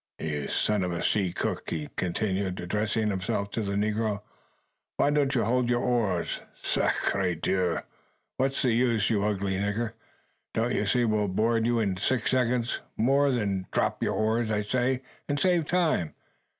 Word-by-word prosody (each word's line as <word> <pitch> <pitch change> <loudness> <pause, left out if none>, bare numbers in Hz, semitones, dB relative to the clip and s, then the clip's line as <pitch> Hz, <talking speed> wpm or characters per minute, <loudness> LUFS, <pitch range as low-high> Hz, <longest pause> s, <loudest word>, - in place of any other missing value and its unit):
ha!" - - -4
"You 75 -2 -2
son 105 -2 +1
of 90 - -1
a 85 - -3
sea 95 -4 +1
cook!" - - -3
he 75 -3 -3
continued, 95 0 -1
addressing 105 +4 0
himself 100 +1 -2
to 115 - -2
the 100 -2 -2
negro; 105 0 0 0.7
"why 145 - +3
don't 145 -2 +2
you 120 - +3
hold 125 +1 +1
your 120 0 +2
oars? 105 -8 0 0.2
Sacre 95 -3 +1
Dieu! 90 +1 0 0.6
what's 135 +1 0
the 125 - +3
use, 115 -3 +2
you 105 -2 +2
ugly 100 -2 0
nigger? 105 +3 -1 0.6
Don't - - +1
you - - 0
see 125 -1 +3
we'll 105 -2 +1
board 110 +4 +1
you 120 0 +2
in 100 -4 0
six 120 +4 0
seconds 125 -1 +1 0.2
more? 140 +5 +3 0.4
Drop - - 0
your - - 0
oars, 110 +1 +1
I 105 -1 0
say, 125 +4 0 0.3
and 145 0 0
save 175 -3 +2
time. 165 - +1
110 Hz, 165 wpm, -28 LUFS, 100-125 Hz, 0.7 s, why